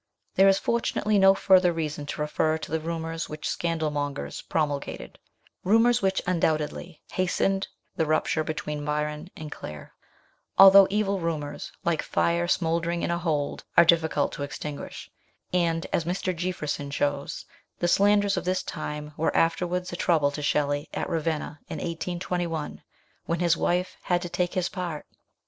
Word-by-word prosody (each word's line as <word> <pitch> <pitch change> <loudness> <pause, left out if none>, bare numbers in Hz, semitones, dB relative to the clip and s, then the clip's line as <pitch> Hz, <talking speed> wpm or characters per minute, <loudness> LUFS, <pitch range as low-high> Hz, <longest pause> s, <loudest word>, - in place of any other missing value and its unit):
There 195 - +5
is, 195 0 +5
fortunately, 215 -2 +1
no 195 0 +7
further 185 -2 +5
reason 150 -3 -4
to 150 - -4
refer 155 +1 +1
to 160 - -8
the 160 - +1
rumours 165 0 -4
which 150 0 -5
scandal 165 -3 -1
mongers 145 -1 -3
promulgated 145 -3 -3 0.4
rumours 230 +5 +4
which 190 -1 +1
undoubtedly 165 -1 -1
hastened 190 +1 0 0.3
the 160 - +1
rupture 155 0 +1
between 150 -1 -4
Byron 150 +2 -2
and 155 -1 -7
Claire; 75 - -9 0.6
although 195 0 +9
evil 200 -1 0
rumours, 155 -4 -4
like 170 -2 +1
fire 170 +1 +1
smouldering 170 0 0
in - - 0
a 170 - 0
hold, 155 -5 -1
are 170 - +9
difficult 160 -3 +3
to - - -7
extinguish, 145 +1 -6 0.5
and, 165 -2 +1
as 170 - +2
Mr. 180 +2 -2
Jeaffreson 155 -5 -3
shows, 145 0 -2 0.3
the 175 - 0
slanders 200 +1 +3
of 180 - -1
this 185 +1 0
time 150 -1 -5
were 160 - +1
afterwards 180 +2 0
a - - -2
trouble 155 -5 +2
to 150 - -5
Shelley 145 0 0
at - - -2
Ravenna, 155 -2 -2
in - - -4
1821, 170 -1 -3 0.5
when 170 0 0
his 170 -2 +3
wife 180 +2 0
had 175 0 0
to 175 - -5
take 175 0 -1
his 180 -1 +1
part. 175 -5 -5
165 Hz, 155 wpm, -26 LUFS, 150-180 Hz, 0.6 s, although